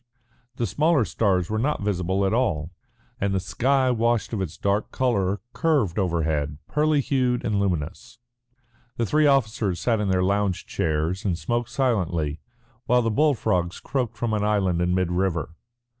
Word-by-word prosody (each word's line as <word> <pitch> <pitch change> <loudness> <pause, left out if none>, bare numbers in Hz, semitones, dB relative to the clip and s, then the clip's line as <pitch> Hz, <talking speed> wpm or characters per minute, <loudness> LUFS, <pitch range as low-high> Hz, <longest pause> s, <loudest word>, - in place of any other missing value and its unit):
The 120 - -1
smaller 145 - +2
stars 95 -6 +1
were 110 - 0
not 140 -2 -1
visible 95 -1 0
at 95 - +1
all, 85 -10 0 0.5
and 100 -1 0
the - - +2
sky 130 +8 +1
washed 115 -1 0
of 105 - -1
its 85 -3 -5
dark 100 +1 0
colour, 100 -7 0
curved 140 - +1
overhead, 80 -5 -1
pearly 150 -1 +2
hued 125 -3 0
and 105 -2 +1
luminous. 85 -5 -3 0.8
The 115 - +1
three 150 +6 +3
officers 110 -9 +1
sat 115 +2 +1
in 105 -2 -1
their 90 -1 +2
lounge 100 -1 0
chairs 80 +4 -1
and 90 -5 0
smoked 120 +4 -2
silently, 90 - 0 0.5
while 125 0 +3
the 115 - 0
bull 150 +5 +3
frogs 90 -4 -1
croaked 125 -4 -3
from 120 -2 -1
an 105 -1 0
island 95 -5 +1
in 90 +1 +1
mid 90 -2 0
river. 90 -3 -1
100 Hz, 165 wpm, -24 LUFS, 90-120 Hz, 0.8 s, three